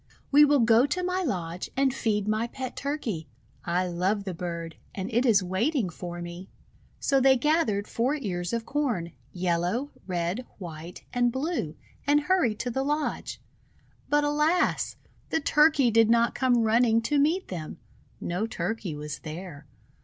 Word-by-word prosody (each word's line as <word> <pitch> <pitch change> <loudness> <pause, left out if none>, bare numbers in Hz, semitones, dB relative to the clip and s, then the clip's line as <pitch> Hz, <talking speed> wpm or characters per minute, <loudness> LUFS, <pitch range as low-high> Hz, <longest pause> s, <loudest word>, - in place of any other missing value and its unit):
We 290 +1 +8
will 290 -2 +4
go 230 +3 +5
to 360 +6 -1
my 365 +1 0
lodge 180 - -3
and 270 -1 +3
feed 210 -6 0
niy 220 +2 0
pet 260 -2 -5
Turkey. 250 - -3 0.4
I 180 +2 +1
love 185 +4 0
the 190 -2 -4
bird, 170 -1 -5 0.2
and 195 +4 -4
it 245 +3 +3
is 205 -4 +5
waiting 200 - 0
for 175 +1 -6
me." 175 +2 -8 0.5
So 275 -1 +2
they 265 0 +6
gathered 245 -8 +1
four 250 +6 0
ears 180 - -3
of 230 -1 -2
Corn, 235 - -1 0.2
yellow, 180 +9 -1 0.2
red, 180 +6 -2
white, 170 -2 -8
and 245 -1 +2
blue, 265 - -2 0.3
and 295 +1 +4
hurried 295 - +2
to 245 - -2
the 265 - -1
lodge. 295 +2 -2 0.7
But, 295 0 +3
alas! 300 +5 +1 0.3
the - - +1
Turkey 300 -4 +4
did 225 0 +5
not 235 0 +4
come 245 -2 +2
running 230 0 +3
to 285 +5 +1
meet 325 +7 +1
them. 165 -4 -6 0.4
No 180 +6 -2
Turkey 190 -3 -3
was 150 0 -6
there. 155 -2 -8
225 Hz, 160 wpm, -27 LUFS, 180-280 Hz, 0.7 s, We